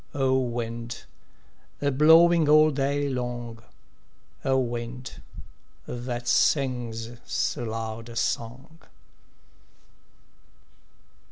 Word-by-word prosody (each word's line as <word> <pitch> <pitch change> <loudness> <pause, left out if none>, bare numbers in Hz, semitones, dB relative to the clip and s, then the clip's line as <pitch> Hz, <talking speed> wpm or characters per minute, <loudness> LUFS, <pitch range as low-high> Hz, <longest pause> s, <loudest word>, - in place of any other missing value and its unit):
O 135 -2 +2
wind, 120 -1 -4 0.8
a 140 0 +1
blowing 160 +3 +6
all 155 +1 +6
day 140 +1 0
long, 120 -3 -4 0.8
O 135 -1 +2
wind, 120 0 -4 0.6
that 120 0 -5
sings 120 -5 +1
so 120 - -2
loud 115 +1 -5
a 115 - -10
song! 125 +8 -3
125 Hz, 80 wpm, -26 LUFS, 115-140 Hz, 0.8 s, blowing